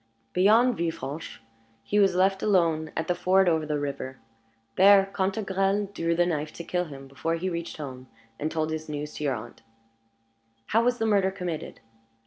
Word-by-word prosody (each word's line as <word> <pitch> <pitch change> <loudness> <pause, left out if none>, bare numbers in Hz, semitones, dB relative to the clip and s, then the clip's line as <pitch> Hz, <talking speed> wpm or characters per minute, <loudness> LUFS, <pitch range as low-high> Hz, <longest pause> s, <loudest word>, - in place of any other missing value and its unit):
Beyond 225 +7 +4
Villefranche, 160 -5 -4 0.4
he 205 - +1
was 195 -3 +4
left 190 +1 +2
alone 165 -6 +2
at 160 - -1
the 180 - +2
ford 185 +2 +3
over 160 -3 +1
the 150 -1 0
river. 140 -2 -4 0.6
There 195 0 +7
Cantegrel 195 0 0
drew 165 -3 0
the 175 +1 +3
knife 155 -3 -2
to 170 - -7
kill 180 +1 -1
him 135 -3 -10
before 140 +5 -2
he 180 +3 -2
reached 170 0 -5
home 130 -4 -8 0.3
and 155 - -1
told 160 -1 -1
his 155 0 -5
news 150 0 -5
to - - -5
your 140 -3 +1
aunt." 115 +1 -10 1.0
"How 225 - +2
was 245 0 +2
the 225 - -1
murder 200 -3 +3
committed?" 180 -5 -5
170 Hz, 175 wpm, -27 LUFS, 150-195 Hz, 1.0 s, There